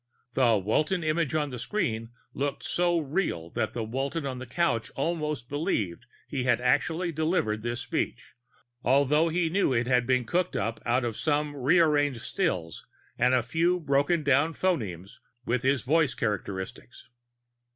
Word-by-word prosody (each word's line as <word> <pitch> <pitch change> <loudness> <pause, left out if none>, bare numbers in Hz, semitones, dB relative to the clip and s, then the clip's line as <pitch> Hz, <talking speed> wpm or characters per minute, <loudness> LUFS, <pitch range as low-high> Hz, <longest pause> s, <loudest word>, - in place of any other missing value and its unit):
The 120 -5 +4
Walton 150 - 0
image 155 -1 0
on 150 -2 0
the 125 - -6
screen 115 - -2 0.2
looked 140 +1 -2
so 175 -1 +1
real 145 - -2
that - - -2
the 115 - -2
Walton 135 +7 -3
on 130 -2 -4
the 130 - -8
couch 125 -4 0
almost 150 -4 -2
believed 110 - -2 0.2
he 130 -3 -2
had 120 -2 +3
actually 160 +8 +1
delivered 155 -9 0
this 120 +1 -3
speech - - -3 0.5
although 140 +5 +3
he 170 +1 +1
knew 165 -4 +1
it 115 0 +1
had 125 -1 +2
been 130 -2 +2
cooked 180 +9 0
up 115 0 -2
out 120 +1 +2
of 115 -2 -3
some 150 -1 0
rearranged 145 -2 +3
stills 105 - -2 0.4
and 125 +2 +4
a 125 - +2
few 170 +8 +1
brokendown 145 0 +2
phonemes 105 - -2 0.3
with 120 +1 0
his 135 -1 +1
voice 150 -2 +2
characteristics. 105 0 -4
140 Hz, 150 wpm, -28 LUFS, 120-160 Hz, 0.5 s, The